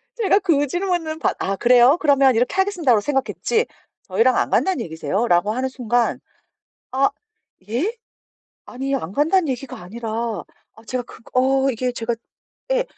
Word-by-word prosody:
제가 420 -3 +3
그 310 -7 +2
질문은 350 -1 -2
받 - - 0
"아 195 +1 -1
그래요? 245 - +5
그러면 275 -4 +4
이렇게 245 +8 +1
하겠습니다."라고 350 - +2
생각했지 295 - 0 0.4
"저희랑 455 - +2
안 - - +1
간다는 375 -9 +1
얘기세요?"라고 175 +5 0
하는 255 +3 -1
순간 245 -2 0 0.7
"아 270 +1 +3 0.6
예? 295 - 0 0.7
아니 270 +2 -3
안 170 -8 -3
간다는 320 - +2
얘기가 260 0 -4
아니라 225 +5 -7 0.6
아 220 - -17
제가 255 +1 -2
그 - - -14
어 265 +1 +3
이게 250 +1 -2
제가 235 0 -2 0.6
예 - - +2
265 Hz, 320 characters per minute, -21 LUFS, 235-320 Hz, 0.7 s, 그래요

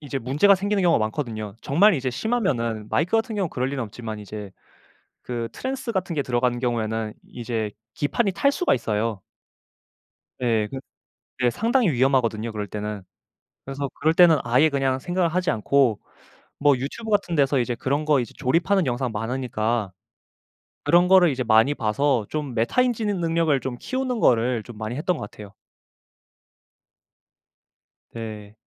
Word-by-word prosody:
이제 140 -2 -4
문제가 140 - +4
생기는 200 +1 0
경우가 170 -6 +4
많거든요. 110 -5 -5
정말 185 +8 +4
이제 130 -2 -2
심하면은 120 - -1
마이크 165 - 0
같은 225 0 +1
경우는 190 -5 -1
그럴 130 +1 -2
리는 135 -2 -3
없지만 110 0 -7
이제 105 -1 -8 0.7
그 120 -2 -4
trans 265 -1 -4
같은 190 -4 -2
게 145 - 0
들어가는 120 -1 0
경우에는 110 -3 -1 0.2
이제 115 -3 -4 0.2
기판이 195 +9 0
탈 280 +9 +2
수가 360 - +2
있어요. 110 -3 -2 1.2
예 115 -4 +1
그 135 - -5 0.6
네 125 -1 +3
상당히 230 - +1
위험하거든요 120 -4 +1
그럴 105 -2 -4
때는. 105 0 -5 0.6
그래서 135 +1 -4
그럴 160 +2 +2
때는 165 -4 +6
아예 125 +6 +4
그냥 135 -2 0
생각을 175 +4 0
하지 180 0 0
않고 115 +1 +2 0.6
뭐 145 -1 +4
유튜브 145 - -6
같은 200 -5 +1
데서 140 -2 +3
이제 120 0 -1
그런 140 +5 -1
거 150 -2 +3
이제 120 - -4
조립하는 170 +7 +2
영상 125 -1 -2
많으니까 115 -2 -2 0.9
그런 175 +1 +4
거를 185 -3 +6
이제 130 -2 -2
많이 115 +5 +4
봐서 120 0 0
좀 150 -5 -3
메타인지 230 - +1
능 200 -4 -1
능력을 165 -4 +2
좀 130 0 -5
키우는 255 -3 -2
거를 120 -1 +2
좀 110 +1 -12
많이 110 +2 -4
했던 165 +5 -1
것 105 - -6
같아요. 105 -2 -12 2.6
네. 110 -2 -8
130 Hz, 340 characters per minute, -24 LUFS, 115-170 Hz, 2.6 s, 때는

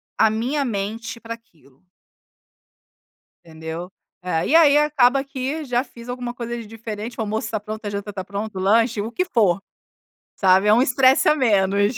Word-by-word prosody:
a 220 - +4
minha 245 +7 -1
mente 225 0 -4
pra 230 0 -6
aquilo. 165 - -20 1.6
Entendeu? 160 +2 -7 0.3
É. 170 -3 -1
E - - +1
ai 305 -3 +7
acaba 275 -3 +3
que 275 +3 -4
já 250 -1 0
fiz 235 -3 -14
alguma 245 -1 -5
coisa 240 -1 -5
de 230 -2 -8
diferente, 225 +1 -7
o - - -2
almoço 220 +1 -2
tá 215 - -2
pronto, 215 +1 -7
a - - -2
janta 205 0 -5
tá 190 -1 -5
pronta, 200 0 -5
o - - -3
lanche 225 +3 +2
o 225 +3 -4
que 365 - 0
for, 205 - +2 0.8
sabe, 190 +1 +4
é - - +6
um 240 - +4
estresse 260 +1 +4
a 305 - +5
menos. 205 -4 +2
225 Hz, 180 wpm, -22 LUFS, 200-250 Hz, 1.6 s, ai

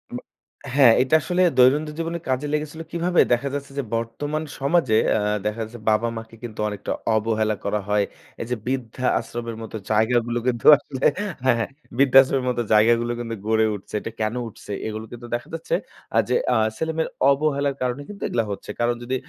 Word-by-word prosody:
ব - - -2 0.6
হ্যাঁ, 130 -5 +7
এটা 130 +4 +2
আসলে 180 +4 0 0.2
দৈনন্দিন 150 +4 +4
জীবনে 165 +1 -2
কাজে 130 +3 0
লেগেছিল 150 +1 -3
কীভাবে? 175 +1 +2
দেখা 135 +3 0
যাচ্ছে 140 -1 -5
যে, - - 0
বর্তমান 145 +7 -3 0.2
সমাজে 140 -4 +2 0.2
আ - - +1 0.3
দেখা 105 +2 -2
যাচ্ছে 115 +2 -9
বাবা 110 +2 +2
মাকে 115 0 -9
কিন্তু 110 -3 -8
অনেকটা 105 -1 -5 0.2
অবহেলা 110 -1 +1
করা 105 +1 0
হয়। 105 0 +3 0.4
এই - - -3
যে 125 - +2
বৃদ্ধা 130 -1 -3
আশ্রম 120 0 -6
এর 110 - -8
মত 110 - -9 0.2
জায়গাগুলো 120 +2 +2
কিন্তু 120 -2 -1
আসলে 135 -2 -8 0.4
হ্যাঁ, 130 -2 +5
হ্যাঁ। 115 - -1 0.3
বৃদ্ধাশ্রমের 135 -1 +5
মত 120 - -1
জায়গাগুলো 115 +2 +4
কিন্তু 115 -1 -4
গড়ে 110 0 +3
উঠছে। 100 - -12
এটা 115 - -6
কেন 110 +2 0
উঠছে? 105 - -11 0.2
এগুলো 110 0 -5
কিন্তু 120 0 -9
দেখা 120 - -6
যাচ্ছে 165 - -1 0.4
আ - - +4
যে - - +2 0.2
আ - - +4 0.2
ছেলেমেয়ের 160 +2 -1 0.2
অবহেলার 140 -1 +1
কারণে 125 +2 -1
কিন্তু 205 -2 -10
এগুলা 115 -2 0
হচ্ছে। 100 - -7
কারণ 120 0 +2
যদি 130 +2 -2
120 Hz, 185 wpm, -23 LUFS, 115-140 Hz, 0.6 s, হ্যাঁ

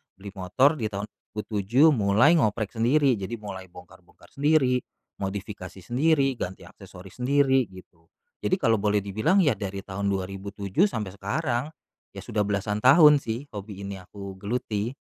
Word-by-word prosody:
beli 100 +1 -10
motor 130 - +2
di 110 - -1
tahun 100 0 -4
2007 110 +7 0
mulai 120 +7 +4
ngoprek 110 -3 0
sendiri. 125 +1 +2
Jadi 100 +4 -4
mulai 95 -3 -8
bongkar-bongkar 90 0 -17
sendiri, 140 -3 +3 0.4
modifikasi 95 -1 -6
sendiri, 135 - +2
ganti 95 +1 -5
aksesoris 90 +4 -14
sendiri 135 -2 +3
gitu. 90 -3 -16 0.4
Jadi 185 +1 +1
kalo 115 -4 +3
boleh 105 0 +1
dibilang 110 - +1
ya 145 - +3
dari 100 0 -5
tahun 100 +1 -3
2007 100 - -2
sampe 105 - -4
sekarang. 125 +6 -2 0.4
Ya - - -8
sudah 105 -1 -1
belasan 105 +1 -1
tahun 150 +2 +8
sih 120 +2 -5
hobi 100 -2 -8
ini 100 0 -6
aku 95 +1 -10
geluti. 105 +2 -3
105 Hz, 145 wpm, -26 LUFS, 100-130 Hz, 0.4 s, tahun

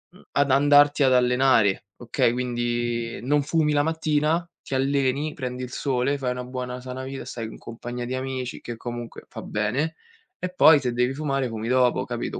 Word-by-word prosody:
mhmm, - - -17
ad 140 -1 +2
andarti 145 +1 +5
ad 130 -1 +4
allenare, 125 -5 +3
okay, 120 -1 +1
quindi 120 -1 -2
non 145 +2 +2
fumi 150 0 +1
la 145 0 +3
mattina, 160 +1 +1 0.2
ti - - -7
alleni, 140 +2 +1
prendi 125 -1 -5
il 125 - -7
sole, 135 +1 0
fai 130 -2 -2
una 125 0 -4
buona 125 0 -5
sana 130 +1 -6
vita, 135 0 -6
stai 115 -2 -5
in - - -10
compagnia 120 +1 -6
di 130 +1 -3
amici, 130 -1 -4
che 120 -1 -7
comunque 120 0 -7
fa - - -8
bene, 125 +10 -1 0.5
e 185 - -3
poi 155 -4 +7
se 125 -2 -2
devi 125 +2 +1
fumare, 135 -3 -1
fumi 110 0 -5
dopo, 125 -1 +2
capito? - - -4
130 Hz, 185 wpm, -24 LUFS, 120-145 Hz, 0.5 s, poi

